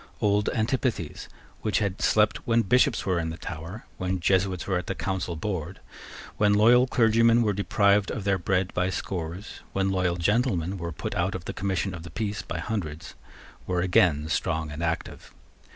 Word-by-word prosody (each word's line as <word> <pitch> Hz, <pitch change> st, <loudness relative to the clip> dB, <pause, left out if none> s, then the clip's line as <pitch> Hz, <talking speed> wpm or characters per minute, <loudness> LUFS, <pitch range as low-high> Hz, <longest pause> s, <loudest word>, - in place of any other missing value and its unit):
Old 105 Hz, 0 st, +2 dB
antipathies, 110 Hz, -, -2 dB, 0.3 s
which 105 Hz, -, 0 dB
had 100 Hz, -3 st, -1 dB
slept 105 Hz, -1 st, +3 dB
when 115 Hz, 0 st, +3 dB
Bishops 125 Hz, +4 st, +2 dB
were 90 Hz, -3 st, +1 dB
in 80 Hz, -1 st, -2 dB
the 80 Hz, -, -6 dB
Tower, 85 Hz, +6 st, -7 dB
when 95 Hz, 0 st, -2 dB
Jesuits 95 Hz, 0 st, +1 dB
were 95 Hz, -2 st, 0 dB
at 90 Hz, -, -8 dB
the -, -, -2 dB
Council 95 Hz, -2 st, -3 dB
board, 90 Hz, 0 st, -4 dB, 0.6 s
when 105 Hz, -1 st, +4 dB
loyal 120 Hz, +4 st, +6 dB
clergymen 115 Hz, -1 st, +4 dB
were 105 Hz, -2 st, +1 dB
deprived 100 Hz, 0 st, +2 dB
of 105 Hz, -, -4 dB
their 100 Hz, -1 st, +1 dB
bread 95 Hz, +1 st, 0 dB
by 90 Hz, +1 st, +1 dB
scores, 90 Hz, +1 st, -5 dB
when 95 Hz, 0 st, +1 dB
loyal 90 Hz, -2 st, +1 dB
gentlemen 95 Hz, -1 st, 0 dB
were 85 Hz, 0 st, -4 dB
put 75 Hz, -, -5 dB
out 90 Hz, +2 st, 0 dB
of 95 Hz, -1 st, -6 dB
the -, -, -4 dB
commission 95 Hz, -1 st, -2 dB
of 85 Hz, -, -7 dB
the 85 Hz, -, -9 dB
peace 105 Hz, -2 st, -3 dB
by 85 Hz, -, -5 dB
hundreds, 80 Hz, -4 st, -4 dB, 0.5 s
were 90 Hz, -1 st, 0 dB
again 85 Hz, -4 st, +3 dB
strong 80 Hz, -1 st, -1 dB
and 75 Hz, +2 st, -6 dB
active. 85 Hz, -1 st, -3 dB
95 Hz, 180 wpm, -26 LUFS, 85-105 Hz, 0.6 s, loyal